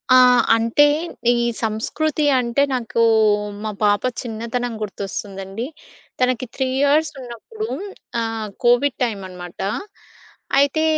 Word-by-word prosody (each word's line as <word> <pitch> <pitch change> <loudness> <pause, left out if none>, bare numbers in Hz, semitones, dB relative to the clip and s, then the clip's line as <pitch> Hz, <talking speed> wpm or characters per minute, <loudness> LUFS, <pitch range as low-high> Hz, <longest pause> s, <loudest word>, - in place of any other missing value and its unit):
ఆ! - - +9 0.4
అంటే 230 +6 +4 0.5
ఈ - - +3 0.3
సంస్కృతి 295 +8 -1
అంటే 245 +3 +1
నాకు 230 -2 -1 0.6
మా 215 - -2
పాప 205 0 +3 0.2
చిన్నతనం 235 +1 -3
గుర్తొస్తుందండి. 195 +1 -5 0.6
తనకి 255 0 +1
3 265 -1 0
ఇయర్స్ 290 +2 +3
ఉన్నప్పుడు 255 - -7 0.5
ఆహ్, 225 -1 -3 0.2
కోవిడ్ 245 +3 +3
టైమన్నమాట. 185 -6 -5 1.0
అయితే, 285 +3 +2
235 Hz, 100 wpm, -21 LUFS, 215-265 Hz, 1.0 s, ఆ